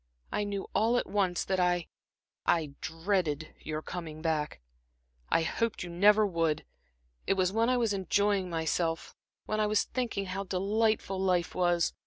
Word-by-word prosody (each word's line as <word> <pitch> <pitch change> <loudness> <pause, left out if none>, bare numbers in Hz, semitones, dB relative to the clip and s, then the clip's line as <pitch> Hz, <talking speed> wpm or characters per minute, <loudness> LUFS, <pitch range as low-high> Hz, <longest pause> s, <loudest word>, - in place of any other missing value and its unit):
I 210 - 0
knew, 200 -1 -3
all 225 +4 +3
at - - 0
once, 190 -3 0
that 190 -1 0
I 175 -1 +2 0.6
I 155 -4 +1
dreaded 165 -3 -1
your 155 0 -4
coming 165 -4 -6
back, 155 - -1 0.7
I 165 - +3
hoped 225 +6 -1
you 175 - -7
never 210 +4 +5
would 165 -5 0 0.6
it 195 - +3
was 185 -1 +2
when 225 +2 +2
I 255 - +3
was 230 -4 +1
enjoying 200 0 +1
myself, 165 0 -1 0.3
when 215 - -1
I 215 - +3
was 210 0 +3
thinking 235 -6 -2
how 190 +1 -3
delightful 195 +1 +1
life 180 -3 +1
was. 175 -2 +2
185 Hz, 160 wpm, -30 LUFS, 165-205 Hz, 0.7 s, never